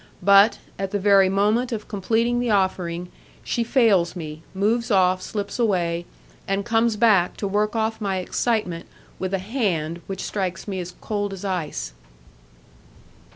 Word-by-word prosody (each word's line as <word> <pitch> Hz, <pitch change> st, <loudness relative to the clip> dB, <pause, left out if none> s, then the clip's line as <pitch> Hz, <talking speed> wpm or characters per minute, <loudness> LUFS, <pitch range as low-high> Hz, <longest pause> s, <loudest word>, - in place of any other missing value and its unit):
but, 200 Hz, +2 st, +6 dB, 0.2 s
at 195 Hz, -1 st, -2 dB
the 205 Hz, -, -1 dB
very 195 Hz, -1 st, +5 dB
moment 210 Hz, +6 st, +1 dB
of 215 Hz, -2 st, -4 dB
completing 225 Hz, +4 st, 0 dB
the 245 Hz, -1 st, -1 dB
offering, 180 Hz, -3 st, 0 dB, 0.3 s
she 235 Hz, -, -1 dB
fails 215 Hz, -9 st, +3 dB
me, 155 Hz, -3 st, -7 dB
moves 230 Hz, +5 st, +1 dB
off, 185 Hz, -3 st, +3 dB
slips 205 Hz, +4 st, -5 dB
away, 175 Hz, -6 st, 0 dB, 0.4 s
and 195 Hz, +1 st, -1 dB
comes 230 Hz, -1 st, +2 dB
back 210 Hz, -5 st, +3 dB
to 200 Hz, -, -2 dB
work 210 Hz, +3 st, 0 dB
off 220 Hz, 0 st, -1 dB
my 195 Hz, -2 st, -1 dB
excitement 185 Hz, -2 st, -1 dB, 0.3 s
with 185 Hz, 0 st, -3 dB
a 195 Hz, -, +1 dB
hand 185 Hz, -, -2 dB
which 195 Hz, -1 st, -5 dB
strikes 190 Hz, -2 st, -3 dB
me 190 Hz, -2 st, -3 dB
as 180 Hz, 0 st, -7 dB
cold 205 Hz, -2 st, -2 dB
as 195 Hz, +1 st, -7 dB
ice. 175 Hz, -, -3 dB
200 Hz, 155 wpm, -23 LUFS, 185-220 Hz, 0.4 s, but